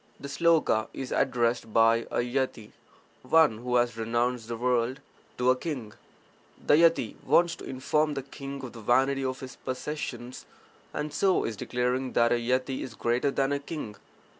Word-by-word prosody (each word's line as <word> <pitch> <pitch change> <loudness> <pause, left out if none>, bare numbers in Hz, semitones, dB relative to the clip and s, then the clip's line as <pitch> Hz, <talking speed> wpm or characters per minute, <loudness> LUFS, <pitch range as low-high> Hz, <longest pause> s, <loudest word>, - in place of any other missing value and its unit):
[The 140 - -7
sloka 160 -7 +2
is 130 -2 -5
addressed 120 -3 +1
by 115 +1 +4
a - - 0
yati 125 -4 -2 0.5
(one 130 -4 +4
who 125 +1 -2
has 120 -2 +2
renounced 120 +1 -1
the 115 0 -4
world) 125 +2 0 0.4
to 125 +1 +4
a - - +3
king. 125 -7 -5 0.7
The - - +4
yati 165 +2 +4
wants 170 0 +3
to - - -10
inform 150 +3 0
the 135 - -3
king 140 0 -8
of 125 - -7
the 115 - -10
vanity 135 +5 +2
of 130 0 -3
his 130 -1 -9
possessions, 130 -2 -5 0.4
and 150 0 -4
so 190 +4 +2
is 115 - -3
declaring 125 +3 -1
that 120 0 +3
a 120 - +2
yati 130 +2 0
is 120 - -7
greater 120 +4 +1
than 135 0 0
the 140 - 0
king. 140 -7 -6
130 Hz, 170 wpm, -28 LUFS, 120-140 Hz, 0.7 s, by